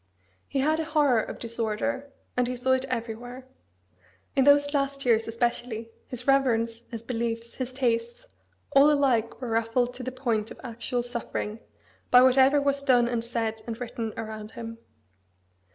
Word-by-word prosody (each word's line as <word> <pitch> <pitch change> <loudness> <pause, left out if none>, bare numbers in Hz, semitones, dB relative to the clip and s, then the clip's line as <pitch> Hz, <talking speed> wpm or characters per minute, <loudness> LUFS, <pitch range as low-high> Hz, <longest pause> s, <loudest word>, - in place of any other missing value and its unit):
He 270 - -1
had 310 +3 +2
a - - 0
horror 295 -7 +3
of - - -7
disorder; 235 +5 -2 0.2
and 250 -1 +2
he 250 - -2
saw 255 +2 0
it 260 0 +2
everywhere. 245 +1 -5 0.9
In 270 - +4
those 285 0 +5
last 275 -1 -1
years, 225 -2 +3
especially, 230 -1 -2 0.2
his 250 -1 -6
reverence, 235 -4 +2
his 230 -2 -6
beliefs, 230 -1 -3
his 255 -1 -4
tastes, 235 -2 -1 0.5
all 275 +2 +7
alike 260 -6 +2
were 250 - -4
ruffled 230 +2 +1
to 255 - -8
the 255 +1 -4
point 235 -4 -1
of - - -11
actual 240 0 -3
suffering, 235 -2 -3 0.5
by 250 0 +8
whatever 265 +2 +5
was 280 0 +1
done 250 -4 +4
and 235 -1 -1
said 225 -2 -2
and 230 0 -5
written 230 -2 -4
around 215 -1 -6
him. 230 0 -7
245 Hz, 160 wpm, -27 LUFS, 230-265 Hz, 0.9 s, by